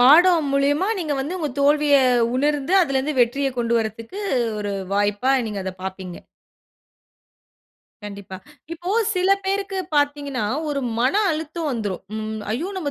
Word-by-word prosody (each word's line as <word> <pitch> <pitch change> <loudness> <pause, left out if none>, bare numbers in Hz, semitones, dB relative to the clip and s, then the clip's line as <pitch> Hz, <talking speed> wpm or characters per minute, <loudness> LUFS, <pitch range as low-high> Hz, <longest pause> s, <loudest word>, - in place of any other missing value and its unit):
பாடம் 315 +4 +6
மூலியமா 290 +7 +2
நீங்க 310 -4 -2
வந்து 320 +7 -3
உங்க 305 -4 -2
தோல்விய 290 0 +4 0.4
உணர்ந்து, 290 +3 0
அதிலலிருந்து 275 -1 -1
வெற்றிய 270 +3 +2
கொண்டு 235 0 0
வர்றதுக்கு 225 - -5 0.4
ஒரு 205 -1 -3 0.2
வாய்ப்பா 205 +6 +1
நீங்க 205 -2 -4
அத 190 - -2
பாப்பீங்க. 190 -2 -6 1.9
கண்டிப்பா. 200 -2 -8 0.4
இப்போ 350 +3 -5 0.2
சில 365 +1 +1
பேருக்கு 390 0 -2 0.2
பார்த்தீங்கனா 285 -4 0 0.2
ஒரு 280 -1 -1 0.2
மன 255 +9 +2 0.2
அழுத்தம் 315 0 -3
வந்துரும். 210 -6 -3
ம். 220 0 -4
ஐயோ! 320 - -2
நம்ம 300 -6 -2
280 Hz, 130 wpm, -22 LUFS, 220-315 Hz, 1.9 s, பாடம்